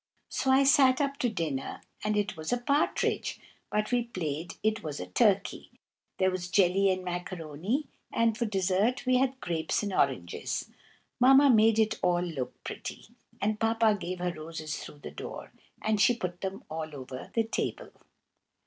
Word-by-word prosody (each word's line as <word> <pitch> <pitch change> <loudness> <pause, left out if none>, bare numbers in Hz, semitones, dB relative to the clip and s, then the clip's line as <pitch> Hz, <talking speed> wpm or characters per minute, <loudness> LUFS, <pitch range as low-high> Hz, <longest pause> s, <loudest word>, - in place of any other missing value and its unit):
So 265 - -1
I 265 +1 +6
sat 270 -2 +5
up 280 -1 0
to 245 - +1
dinner, 160 -10 -3 0.2
and 210 0 +1
it 205 -1 0
was 160 -1 -5
a 245 - +3
partridge, 280 +5 0 0.3
but 210 +2 0
we 245 0 +3
played 165 -6 -4
it 220 +1 +1
was 150 -2 -5
a 90 - -4
turkey. 90 - +1 0.5
There 190 0 +3
was 180 -1 -4
jelly 195 +1 +4
and 185 -1 0
macaroni, 180 - -3 0.3
and 230 -1 +2
for 235 +1 -1
desert 200 +6 +1
we 255 0 +4
had 265 0 +1
grapes 165 +3 -1
and 200 -2 -2
oranges. 125 - -1 0.5
Mamma 270 +2 +7
made 220 -1 +5
it 220 -1 +2
all 175 -1 +2
look 155 -8 -5
pretty, - - -7 0.3
and 215 +1 0
Papa 225 -1 +3
gave 185 -2 -4
her 180 0 -2
roses 155 -1 -5
through 145 - -11
the - - -6
door, 75 - -8 0.3
and 215 -1 +2
she 240 +4 +5
put 180 -4 -4
them 195 0 -4
all 155 -1 -5
over 130 -1 -8
the 225 - +3
table. 225 - -3
195 Hz, 170 wpm, -29 LUFS, 165-230 Hz, 0.5 s, Mamma